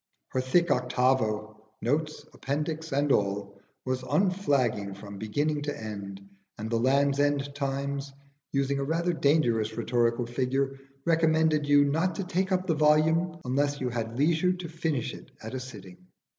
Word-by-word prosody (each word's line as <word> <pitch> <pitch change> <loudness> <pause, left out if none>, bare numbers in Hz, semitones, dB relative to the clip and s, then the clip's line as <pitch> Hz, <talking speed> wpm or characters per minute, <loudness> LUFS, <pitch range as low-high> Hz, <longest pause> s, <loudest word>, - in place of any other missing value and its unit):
Her 130 - 0
thick 170 +7 +2
octavo 125 -4 +1 0.2
notes, 150 +6 -1
appendix 155 +3 -3
and 140 +1 +1
all 100 -1 0 0.2
was 130 0 -1
unflagging 140 - +1
from 100 0 -9
beginning 145 +8 -1
to 145 0 -4
end; 100 -3 -7 0.3
and 110 +2 -5
the 115 - +2
'Land's 140 +3 +3
End 145 -1 +1
Times,' 140 0 -3 0.4
using 140 0 0
a - - 0
rather 170 +4 0
dangerous 120 -9 +2
rhetorical 120 0 +1
figure, 135 +3 -1 0.3
recommended 160 -2 +3
you 145 0 +6
not 160 +5 +1
to 195 - -2
take 185 +1 -1
up 185 0 +1
the 170 - +2
volume 160 +3 +3
unless 145 +3 0
you 130 - -1
had 115 -1 -4
leisure 165 +5 +3
to 180 -1 -6
finish 160 -6 -2
it - - -11
at 110 - -6
a 130 - -2
sitting. 95 -8 -11
140 Hz, 155 wpm, -28 LUFS, 120-155 Hz, 0.4 s, you